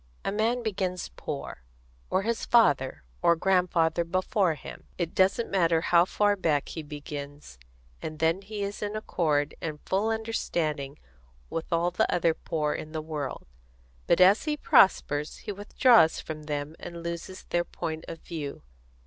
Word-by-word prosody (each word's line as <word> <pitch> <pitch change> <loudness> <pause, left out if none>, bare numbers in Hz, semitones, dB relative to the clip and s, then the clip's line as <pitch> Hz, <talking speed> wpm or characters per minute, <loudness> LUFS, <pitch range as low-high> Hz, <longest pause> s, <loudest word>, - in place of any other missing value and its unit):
A - - 0
man 230 +4 0
begins 185 -4 -2
poor, - - -6 0.5
or 195 - +1
his 230 +1 -1
father 140 - +3 0.2
or 170 - +5
grandfather 175 -2 +2
before 185 0 +1
him 145 - -11
it 170 -2 -2
doesn't 195 +5 +2
matter 170 -4 +3
how 170 0 +4
far 205 +2 +2
back 160 -7 0
he 160 - -5
begins 145 - -8 0.4
and 155 - -5
then 165 +4 +1
he 205 +1 -5
is 200 +1 -4
in 210 0 -3
accord 155 -8 0
and 155 -2 -4
full 200 +4 +1
understanding 160 -11 -2 0.5
with 165 - -4
all 170 +1 +2
the 180 - +1
other 170 -2 +2
poor 150 -2 -2
in 155 +1 -6
the 160 - -2
world; 150 -4 -5 0.6
but - - +4
as 190 +8 +6
he 300 -1 0
prospers 160 - +3
he - - -2
withdraws 205 -3 +4
from 155 -1 -7
them 150 +1 -3
and 170 -1 -8
loses 170 +2 -6
their 175 0 +2
point 160 -2 -5
of 165 - -8
view. 150 -4 -6
170 Hz, 155 wpm, -28 LUFS, 155-195 Hz, 0.6 s, as